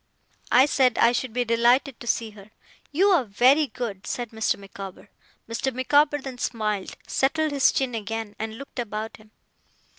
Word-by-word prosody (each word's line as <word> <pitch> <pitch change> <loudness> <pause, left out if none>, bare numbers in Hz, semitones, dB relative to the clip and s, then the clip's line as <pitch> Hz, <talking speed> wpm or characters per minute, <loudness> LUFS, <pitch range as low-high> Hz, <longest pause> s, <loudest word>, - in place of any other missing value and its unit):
I 255 +2 +7
said 260 -4 +2
I 235 - +5
should 250 0 -2
be 245 +2 -1
delighted 240 +3 +2
to 240 - -10
see 225 -1 0
her. 205 0 -15 0.4
'You 370 +8 +3
are 355 -8 +4
very 255 +8 +4
good,' 215 -8 -6
said 240 -2 -4
Mr. 220 -1 0
Micawber. 195 -1 -10 0.4
Mr. 230 +4 -2
Micawber 290 +4 +3
then 265 -3 -8
smiled, 215 -5 -2
settled 310 +3 0
his 280 -2 +4
chin 265 -2 -1
again, 225 -1 -4
and 220 0 -4
looked 275 -1 -9
about 220 -1 -4
him. 215 0 -20
240 Hz, 170 wpm, -25 LUFS, 220-270 Hz, 0.4 s, I